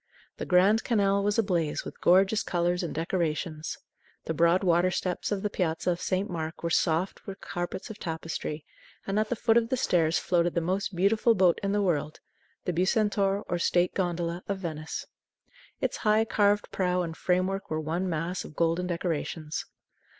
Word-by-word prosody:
The -, -, -5 dB
Grand 195 Hz, +5 st, +4 dB
Canal 200 Hz, -4 st, +2 dB
was 205 Hz, +1 st, +1 dB
ablaze 175 Hz, -8 st, 0 dB
with -, -, -9 dB
gorgeous 190 Hz, +4 st, +4 dB
colors 175 Hz, 0 st, 0 dB
and 170 Hz, -, -3 dB
decorations. 160 Hz, -1 st, -2 dB, 0.5 s
The 160 Hz, -, -2 dB
broad 170 Hz, +4 st, +3 dB
water 175 Hz, 0 st, +3 dB
steps 180 Hz, +1 st, -2 dB
of 200 Hz, -1 st, -1 dB
the 210 Hz, -, 0 dB
Piazza 170 Hz, -1 st, 0 dB
of 175 Hz, -, -3 dB
St. 190 Hz, +2 st, 0 dB
Mark 160 Hz, -2 st, -5 dB
was 170 Hz, -1 st, +1 dB
soft 170 Hz, +3 st, 0 dB
with 195 Hz, 0 st, -7 dB
carpets 175 Hz, +5 st, -5 dB
of 215 Hz, -, -10 dB
tapestry, 160 Hz, -2 st, -4 dB, 0.4 s
and 195 Hz, +2 st, 0 dB
at 215 Hz, 0 st, 0 dB
the 245 Hz, -, 0 dB
foot 225 Hz, 0 st, +3 dB
of 230 Hz, -1 st, +2 dB
the 260 Hz, -, 0 dB
stairs 170 Hz, -9 st, +2 dB
floated 175 Hz, -1 st, +1 dB
the -, -, +3 dB
most 185 Hz, +3 st, -2 dB
beautiful 215 Hz, +5 st, +3 dB
boat 180 Hz, -3 st, +4 dB
in 195 Hz, -, -1 dB
the 205 Hz, 0 st, +1 dB
world, 155 Hz, -5 st, -1 dB, 0.5 s
the 180 Hz, -, 0 dB
Bucentaur 200 Hz, +2 st, +1 dB
or 175 Hz, -, -1 dB
state 175 Hz, +1 st, +2 dB
gondola, 175 Hz, -1 st, -2 dB
of 200 Hz, -, -1 dB
Venice. 160 Hz, -4 st, -5 dB, 0.8 s
Its -, -, -1 dB
high, 215 Hz, +1 st, +3 dB
carved 205 Hz, -2 st, +2 dB
prow 180 Hz, -1 st, 0 dB
and 165 Hz, -1 st, -5 dB
framework 185 Hz, +3 st, 0 dB
were 155 Hz, -, -1 dB
one 165 Hz, +4 st, -2 dB
mass 165 Hz, +2 st, -2 dB
of 150 Hz, -, -11 dB
golden 170 Hz, +2 st, +1 dB
decorations. 165 Hz, -3 st, -3 dB
180 Hz, 180 wpm, -28 LUFS, 170-200 Hz, 0.8 s, Grand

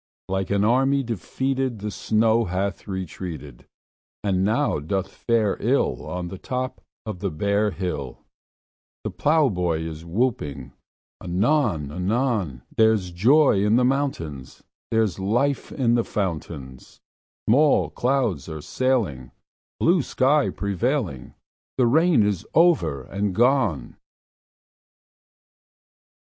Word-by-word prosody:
Like 95 Hz, -1 st, -2 dB
an 100 Hz, 0 st, +2 dB
army 135 Hz, +5 st, +3 dB
defeated 130 Hz, -, -2 dB
The 105 Hz, +1 st, -5 dB
snow 110 Hz, +2 st, +2 dB
hath 95 Hz, +2 st, -3 dB
retreated, 85 Hz, -8 st, -6 dB, 0.6 s
And 95 Hz, -2 st, +1 dB
now 110 Hz, -, +1 dB
doth 95 Hz, +6 st, -3 dB
fare 115 Hz, -4 st, 0 dB
ill -, -, 0 dB
On 90 Hz, -1 st, -4 dB
the 95 Hz, +1 st, -8 dB
top 130 Hz, 0 st, -4 dB, 0.2 s
of 105 Hz, -5 st, -5 dB
the 100 Hz, -, -1 dB
bare 100 Hz, +6 st, +1 dB
hill; 90 Hz, -10 st, -5 dB, 0.8 s
The -, -, -3 dB
plowboy 95 Hz, -, +1 dB
is 80 Hz, -1 st, -6 dB
whooping 80 Hz, -, -2 dB, 0.5 s
anon 95 Hz, -, +1 dB
anon: 95 Hz, -, -1 dB
There's 110 Hz, -5 st, +3 dB
joy 115 Hz, -, +4 dB
in 105 Hz, +2 st, +3 dB
the 125 Hz, +1 st, +4 dB
mountains; 85 Hz, -, -2 dB, 0.3 s
There's 110 Hz, -5 st, +1 dB
life 120 Hz, +9 st, 0 dB
in 120 Hz, -3 st, +1 dB
the 120 Hz, -1 st, +2 dB
fountains; 80 Hz, -, -5 dB, 0.5 s
Small 145 Hz, +6 st, +4 dB
clouds 120 Hz, -, 0 dB
are 80 Hz, -1 st, -6 dB
sailing, 100 Hz, -, -1 dB, 0.5 s
Blue 170 Hz, 0 st, +3 dB
sky 140 Hz, +3 st, +2 dB
prevailing; 100 Hz, -, -2 dB, 0.4 s
The 125 Hz, -, +4 dB
rain 155 Hz, 0 st, +4 dB
is 100 Hz, -4 st, 0 dB
over 165 Hz, -, +3 dB
and 100 Hz, +4 st, -3 dB
gone! 115 Hz, -, +1 dB
105 Hz, 110 wpm, -24 LUFS, 85-125 Hz, 0.8 s, joy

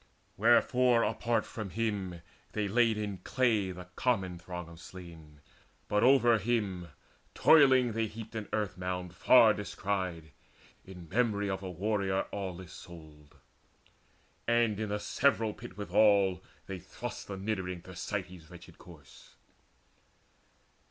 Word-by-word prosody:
Wherefore 120 Hz, +2 st, +4 dB
apart 120 Hz, -1 st, 0 dB
from 110 Hz, -3 st, -6 dB
him 100 Hz, -5 st, -3 dB, 0.3 s
they 105 Hz, -1 st, -1 dB
laid 115 Hz, +1 st, +3 dB
in 100 Hz, -3 st, -4 dB
clay 110 Hz, -3 st, +1 dB
The 90 Hz, -1 st, -8 dB
common 95 Hz, -8 st, 0 dB
throng 90 Hz, -1 st, -7 dB
of 85 Hz, 0 st, -13 dB
slain; 80 Hz, -5 st, -12 dB, 0.5 s
but 105 Hz, -, +1 dB
over 120 Hz, -3 st, +5 dB
him 100 Hz, -5 st, -1 dB, 0.5 s
Toiling 130 Hz, -6 st, +6 dB
they 110 Hz, 0 st, -1 dB
heaped 110 Hz, +1 st, -9 dB
an 110 Hz, -2 st, -5 dB
earth 105 Hz, -4 st, -2 dB
mound 90 Hz, -1 st, -4 dB
far 110 Hz, +4 st, +6 dB
descried 95 Hz, -6 st, -4 dB, 0.5 s
In 90 Hz, -3 st, -11 dB
memory 105 Hz, -1 st, 0 dB
of 95 Hz, 0 st, -3 dB
a 95 Hz, -, -5 dB
warrior 95 Hz, +1 st, -1 dB
aweless 95 Hz, -3 st, -6 dB
souled. 75 Hz, -3 st, -13 dB, 1.1 s
And 115 Hz, -3 st, +2 dB
in 110 Hz, -2 st, -3 dB
a 105 Hz, -, 0 dB
several 115 Hz, 0 st, +1 dB
pit 95 Hz, -, -11 dB
withal 100 Hz, -2 st, +3 dB, 0.2 s
they 95 Hz, -1 st, -6 dB
thrust 115 Hz, +7 st, -7 dB
The 100 Hz, -, -5 dB
niddering 95 Hz, -3 st, -3 dB
Thersites' 90 Hz, -2 st, -6 dB
wretched 90 Hz, -1 st, -14 dB
corse. 75 Hz, -6 st, -16 dB
100 Hz, 125 wpm, -31 LUFS, 90-110 Hz, 1.1 s, Toiling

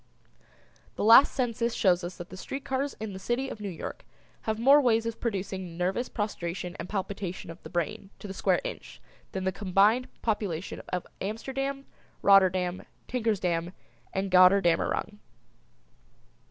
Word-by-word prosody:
The -, -, -2 dB
last 230 Hz, +6 st, +8 dB
census 235 Hz, -2 st, -1 dB
shows 180 Hz, -2 st, +3 dB
us 175 Hz, +1 st, -6 dB
that 175 Hz, +1 st, -8 dB
the 185 Hz, -, -9 dB
street 270 Hz, +8 st, -6 dB
cars 270 Hz, +2 st, -1 dB
in 215 Hz, -2 st, -5 dB
the 190 Hz, -, -7 dB
city 240 Hz, +7 st, -1 dB
of -, -, -7 dB
New 205 Hz, -1 st, -4 dB
York 175 Hz, -, -7 dB, 0.4 s
have 220 Hz, -1 st, 0 dB
more 275 Hz, +6 st, +6 dB
ways 230 Hz, -3 st, +2 dB
of 230 Hz, -1 st, -4 dB
producing 190 Hz, -5 st, -3 dB
nervous 190 Hz, +8 st, -1 dB
prostration 180 Hz, -4 st, -4 dB
and -, -, -6 dB
palpitation 195 Hz, -3 st, -4 dB
of 165 Hz, -, -12 dB
the -, -, -10 dB
brain 175 Hz, +2 st, -3 dB
to -, -, -12 dB
the 190 Hz, -, -6 dB
square -, -, +1 dB
inch -, -, -7 dB, 0.3 s
than 190 Hz, -, -3 dB
the 190 Hz, -, +1 dB
combined 205 Hz, +5 st, +3 dB, 0.2 s
population 205 Hz, -6 st, -2 dB
of 180 Hz, -1 st, -2 dB, 0.2 s
Amsterdam, 270 Hz, +7 st, -3 dB, 0.4 s
Rotterdam, 185 Hz, -2 st, +4 dB, 0.3 s
Tinkersdam 185 Hz, -8 st, -1 dB, 0.4 s
and 190 Hz, 0 st, -2 dB
Gotterdammerung. 185 Hz, +2 st, +4 dB
200 Hz, 150 wpm, -28 LUFS, 185-230 Hz, 0.4 s, last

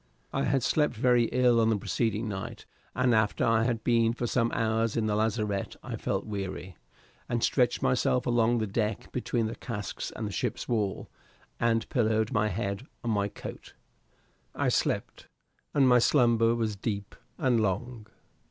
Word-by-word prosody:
I 135 Hz, +1 st, 0 dB
had 135 Hz, -1 st, +1 dB
slept 150 Hz, -4 st, +2 dB
very 120 Hz, +1 st, +3 dB
ill 120 Hz, -1 st, +3 dB
on 110 Hz, -, +3 dB
the 110 Hz, -, +2 dB
preceding 110 Hz, +2 st, -1 dB
night, 95 Hz, -2 st, -6 dB, 0.3 s
and 125 Hz, -1 st, +3 dB
after 110 Hz, -2 st, +2 dB
I 115 Hz, 0 st, +3 dB
had 115 Hz, -2 st, -1 dB
been 115 Hz, -1 st, +3 dB
for 120 Hz, -, -3 dB
some 115 Hz, 0 st, +1 dB
hours 115 Hz, 0 st, 0 dB
in 115 Hz, -, +1 dB
the 105 Hz, -1 st, +1 dB
lazarette 105 Hz, -2 st, -1 dB
I -, -, -5 dB
felt -, -, -2 dB
weary, 95 Hz, -3 st, -5 dB, 0.5 s
and 120 Hz, 0 st, -1 dB
stretched 125 Hz, -3 st, +2 dB
myself 125 Hz, 0 st, +2 dB
along 120 Hz, -1 st, +3 dB
the 110 Hz, -, 0 dB
deck 105 Hz, 0 st, -2 dB
between 120 Hz, -2 st, -1 dB
the 110 Hz, -, -3 dB
casks 105 Hz, -6 st, -5 dB
and -, -, -3 dB
the -, -, -5 dB
ship's -, -, -3 dB
wall, 105 Hz, -5 st, -1 dB, 0.5 s
and 115 Hz, -1 st, +1 dB
pillowed 110 Hz, -2 st, +1 dB
my 105 Hz, 0 st, +2 dB
head 100 Hz, +4 st, -3 dB, 0.2 s
on 120 Hz, -, -1 dB
my 100 Hz, -1 st, +1 dB
coat. -, -, -9 dB, 0.8 s
I -, -, +1 dB
slept, -, -, -1 dB, 0.4 s
and 140 Hz, -2 st, +4 dB
my 125 Hz, -1 st, +6 dB
slumber 115 Hz, -3 st, +4 dB
was 110 Hz, -3 st, -1 dB
deep 100 Hz, 0 st, -4 dB, 0.2 s
and 125 Hz, -4 st, +2 dB
long. 105 Hz, +3 st, -2 dB
115 Hz, 170 wpm, -28 LUFS, 105-120 Hz, 0.8 s, my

